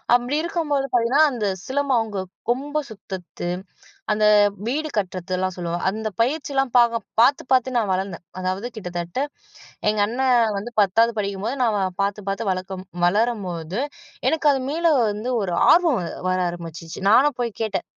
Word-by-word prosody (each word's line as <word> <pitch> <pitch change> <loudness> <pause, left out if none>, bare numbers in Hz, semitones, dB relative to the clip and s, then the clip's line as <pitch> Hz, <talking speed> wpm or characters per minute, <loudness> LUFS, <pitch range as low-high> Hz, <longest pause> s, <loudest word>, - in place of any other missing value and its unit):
அப்டி 245 +4 0
இருக்கும்போது 310 -5 -1
பார்த்தீங்கன்னா, 245 +5 +3
அந்த 235 -5 -2 0.2
சிலம்பம் 270 -2 +1
அவங்க 210 -4 -3 0.3
கொம்ப 285 +5 0
சுத்தத்து 190 -4 -7 0.6
அந்த 215 0 +2 0.4
வீடு 305 +5 -1
கட்டுறதுலாம் 185 -1 -2
சொல்லுவாங்க. 175 -1 -3
அந்த 220 +2 -3
பயிற்சியிலாம் 270 -1 0
பாக 235 -1 +4 0.2
பாத்து 275 +4 +4
பாத்து 255 0 +3
நான் 215 -5 +1
வளர்ந்தேன். 185 -2 -3 0.2
அதாவது 185 +5 -2
கிட்டத்தட்ட, 175 -1 -4 0.7
எங்கண்ணன் 230 +2 +2
வந்து 215 +5 -6
10வது 225 +4 +3
படிக்கும்போது 200 +5 -2
நான் 235 - +3
அவன 195 -3 0
பாத்து 200 +1 -1
பாத்து 200 +4 -2
வளக்கும் 185 0 -5 0.2
வளரும்போது, 190 -3 -1 0.5
எனக்கு 315 -1 +2
அது 270 - 0
மீள 335 +3 0 0.3
வந்து 215 +5 -4
ஒரு 180 -3 -2 0.2
ஆர்வம் 330 - +4 0.3
வர 185 0 +1
ஆரம்பிச்சுச்சு. 170 +1 -7
நானும் 265 +4 +5
போய் 235 -2 -1
கேட்டேன், 220 -2 -2
220 Hz, 140 wpm, -23 LUFS, 185-255 Hz, 0.7 s, நானும்